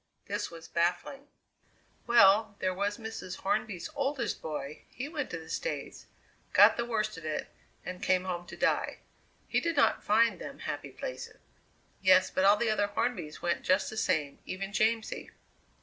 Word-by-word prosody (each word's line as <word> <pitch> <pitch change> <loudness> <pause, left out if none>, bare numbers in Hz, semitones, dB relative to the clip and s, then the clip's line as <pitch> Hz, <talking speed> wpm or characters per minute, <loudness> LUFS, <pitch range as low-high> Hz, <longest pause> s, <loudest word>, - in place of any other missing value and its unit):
This - - -3
was 165 -1 -11
baffling. 175 +12 -1 0.8
"Well, 215 -2 +6
there 185 -1 0
was 200 +2 -1
Mrs. 220 -5 -6
Hornby's 205 -2 -1
oldest 275 -3 -2
boy, 150 -2 -5
he 260 - -6
went 295 -3 -4
to 175 - -4
the 160 -1 -11
States, - - -4 0.5
got - - +8
the 235 - -1
worst 215 -5 -1
of - - -15
it, 155 - -3 0.4
and 180 0 -6
came 185 -1 +2
home 175 -2 -4
to - - -9
die. - - +1 0.5
He - - +2
did 335 -1 -1
not 285 - +3
find 225 +2 +3
them - - -7
happy - - -5
places." - - -7 0.6
"Yes, 185 -1 +5
but 185 - +2
all 200 +1 +7
the 235 -1 +1
other 205 -1 +1
Hornbys 205 -7 -3
went 175 0 0
just 190 +1 +2
the - - -7
same, 150 -9 0
even 195 +1 -5
Jamsie. 220 +1 0
200 Hz, 165 wpm, -30 LUFS, 180-230 Hz, 0.8 s, got